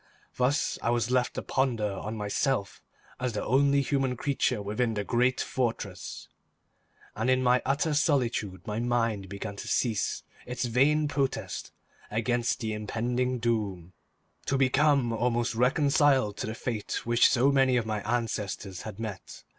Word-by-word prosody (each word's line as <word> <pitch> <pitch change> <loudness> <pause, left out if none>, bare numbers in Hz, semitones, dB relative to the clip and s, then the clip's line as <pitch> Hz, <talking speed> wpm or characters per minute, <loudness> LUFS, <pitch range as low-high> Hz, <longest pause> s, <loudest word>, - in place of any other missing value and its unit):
Thus 130 +5 +1
was 120 0 +1
I - - +1
left 125 -1 +1
to - - -3
ponder 120 -6 0
on 105 +3 -5
myself 105 +1 -1 0.4
as 125 -2 -1
the 105 - -3
only 140 +3 +3
human 135 -2 0
creature 130 -4 0
within 110 +3 -1
the 105 - -1
great 125 +4 +1
fortress, 120 -3 -3 0.9
and 110 +4 0
in 130 0 +3
my 125 0 +4
utter 145 +3 +1
solitude 125 - 0
my 105 +1 -3
mind 115 -5 0
began 100 +1 -6
to - - -7
cease 110 -6 0 0.2
its 125 0 -2
vain 145 +6 +3
protest 140 -2 -2 0.4
against 120 +2 0
the 110 -1 -2
impending 120 +4 -1
doom, 105 -7 -2 0.5
to 135 - +1
become 135 -2 +3
almost 120 0 0
reconciled 135 -2 +3
to - - -3
the 110 - -4
fate 115 -3 -3
which 120 0 +5
so 135 +2 +3
many 135 -2 +3
of 120 - 0
my 110 -1 -2
ancestors 105 -5 -2
had 105 -1 -8
met. 105 -4 -7
120 Hz, 150 wpm, -28 LUFS, 110-130 Hz, 0.9 s, which